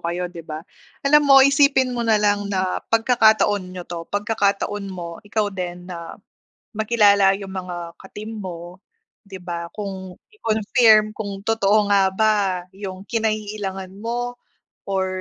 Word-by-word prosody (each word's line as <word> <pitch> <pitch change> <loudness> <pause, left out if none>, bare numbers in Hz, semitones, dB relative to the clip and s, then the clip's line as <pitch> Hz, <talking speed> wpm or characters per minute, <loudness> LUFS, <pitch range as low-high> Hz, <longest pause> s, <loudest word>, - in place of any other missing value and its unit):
kayo, 175 +1 -3
di 170 - -8
ba? 155 +1 -8 0.4
Alam 295 +2 +6
mo, 275 - +8
isipin 275 -2 +4
mo 240 - -3
na 225 -2 +3
lang 205 -1 +1
na 185 -2 -1
pagkakataon 220 -3 +3
ninyo 180 -1 -8
'to, 170 -1 -7
pagkakataon 205 -1 -1
mo, 170 -3 -7
ikaw 205 -1 -2
din 180 -1 -5
na, 170 -2 -8 0.6
makilala 205 -3 +4
yung 195 -1 -8
mga 180 -2 -6
ka-team 215 +3 -8
mo, 175 -1 -8 0.5
di 195 - -9
ba? 175 -2 -5
Kung 190 -3 -6 0.2
i-confirm 215 - +3
kung 200 -2 -6
totoo 210 -1 +2
nga 195 -1 +5
ba, 215 +3 +2 0.4
yung 190 -1 -8
kinaiilangan 210 -4 -3
mo 245 +2 -4 0.5
or 190 -1 0
200 Hz, 140 wpm, -22 LUFS, 185-220 Hz, 0.6 s, mo